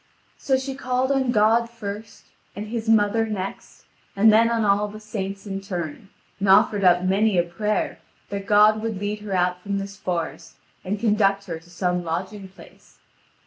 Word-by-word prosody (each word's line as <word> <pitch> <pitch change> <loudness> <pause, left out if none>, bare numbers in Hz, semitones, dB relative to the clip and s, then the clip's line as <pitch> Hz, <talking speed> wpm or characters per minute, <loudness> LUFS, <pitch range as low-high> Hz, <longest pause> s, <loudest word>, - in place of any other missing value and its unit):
So 265 -1 +1
she 265 +1 -4
called 255 0 -1
on 270 -2 +1
God 230 +1 +3
first, 210 -2 -8 0.3
and 210 +1 -6
His 225 -1 -3
mother 225 +1 +3
next, 195 -3 -6 0.3
and 215 +2 +5
then 230 +1 +5
on 230 -2 +1
all 205 +1 +2
the 210 +1 -10
saints 200 -2 -5
in 195 -1 -4
turn, 180 -2 -6 0.3
and 200 0 0
offered 200 +1 +5
up 180 -1 +5
many 195 +2 +2
a 175 - +4
prayer 210 +5 -2 0.3
that 200 0 -5
God 210 +1 +5
would 220 -2 -3
lead 205 +1 -3
her 210 -2 -6
out 180 0 0
from 200 +1 -3
this 195 0 -6
forest 170 -4 -4 0.3
and 200 +2 -3
conduct 200 -3 +2
her 165 -4 -5
to 170 +2 -21
some 180 0 -1
lodging 190 +4 -4
place. 190 - -18
205 Hz, 180 wpm, -23 LUFS, 190-220 Hz, 0.3 s, and